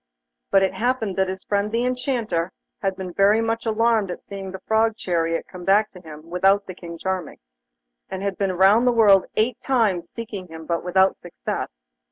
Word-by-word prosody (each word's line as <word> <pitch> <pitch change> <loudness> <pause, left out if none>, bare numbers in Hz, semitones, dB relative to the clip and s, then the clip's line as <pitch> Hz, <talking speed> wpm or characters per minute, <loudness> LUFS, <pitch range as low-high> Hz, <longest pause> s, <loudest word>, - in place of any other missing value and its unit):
But 195 0 +4
it 190 - +1
happened 230 -5 -1
that 190 -1 +2
his 190 +1 -5
friend 205 +1 -1
the 235 +2 0
Enchanter 245 -9 -1 0.3
had 195 -1 0
been 185 -2 -6
very 200 +3 +4
much 225 0 -1
alarmed 225 -2 +2
at 180 - -6
seeing 195 -1 -7
the 190 - -6
Frog 220 0 +2
chariot 165 -4 -1
come 180 -1 -10
back 205 +4 +3
to 180 - -13
him 155 -1 -11
without 195 +3 +3
King 170 -2 -9
Charming, 185 -2 -3 0.7
and 190 0 -5
had 200 -1 -1
been 195 -1 -1
round 200 +7 +5
the - - +6
world 205 -5 +5
eight 225 +2 0
times 210 -10 +1
seeking 215 -5 -7
him, 160 -1 -10
but 170 +1 -2
without 190 +2 +2
success. 175 - -5
195 Hz, 190 wpm, -23 LUFS, 180-225 Hz, 0.7 s, the